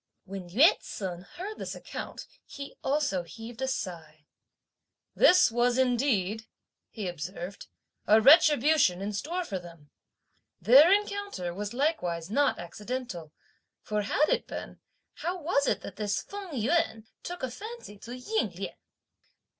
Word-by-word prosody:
When 190 -2 -7
Yü 280 - +5
ts'un 180 -3 -6
heard 385 - -8
this - - -5
account - - -7 0.2
he 280 0 -9
also 270 -10 +1
heaved 225 +7 -10
a 265 - 0
sigh. 165 - -5 0.9
"This 365 -9 +6
was 240 +1 +2
indeed," 230 -5 +1 0.4
he 210 -4 -5
observed, 175 +3 -6 0.4
"a 215 +1 +7
retribution 295 - +6
in 200 +2 -3
store 340 - -2
for 195 - -3
them! 170 -4 -14 0.7
Their 270 - +7
encounter 405 - 0
was 205 +4 -5
likewise 190 - -1
not 285 +4 +2
accidental; 205 -2 -6 0.5
for 210 0 -1
had 285 +9 +2
it - - 0
been, - - -7 0.4
how 360 +2 -3
was 290 -3 +1
it - - +1
that - - -9
this 205 -2 -1
Feng 400 -2 -8
Yüan 245 -2 0 0.2
took 355 -4 -7
a 255 - -2
fancy 425 - -9
to 245 +4 -8
Ying 435 - -1
Lien? - - -5
230 Hz, 140 wpm, -29 LUFS, 190-300 Hz, 0.9 s, a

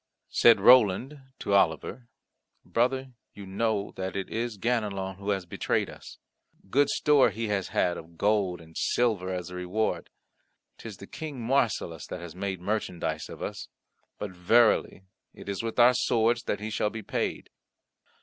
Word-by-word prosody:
Said 115 - +6
Roland 125 +4 +5 0.2
to 100 - -2
Oliver, 100 +6 +1 0.6
"Brother, 130 +2 0 0.2
you 100 - -9
know 100 +1 -1
that 95 0 -4
it 100 -1 -3
is 115 -1 -3
Ganelon 100 -4 -1
who 100 +1 -6
has 95 -3 0
betrayed 85 - -1
us. - - -12 0.5
Good 140 +2 +3
store 145 -4 +4
he 110 +1 -4
has 100 -3 -1
had 90 -1 0
of 85 +1 -12
gold 100 -4 +1
and 80 0 -16
silver 105 -7 0
as 90 -1 -4
a - - -7
reward; 90 +5 -2 0.7
'tis 110 -4 -8
the 100 - -10
King 150 +3 -7
Marsilas 115 - 0
that - - -6
has 85 -1 -9
made 95 -1 -3
merchandise 90 -5 -3
of - - -8
us, - - -5 0.5
but 105 -2 -5
verily 95 +1 +3 0.3
it - - -12
is 100 -2 -3
with 115 -1 -4
our 125 +1 +7
swords 120 -1 +2
that 105 - -1
he 110 +1 -4
shall 105 - 0
be 110 0 -7
paid." - - -3
105 Hz, 160 wpm, -28 LUFS, 95-120 Hz, 0.7 s, our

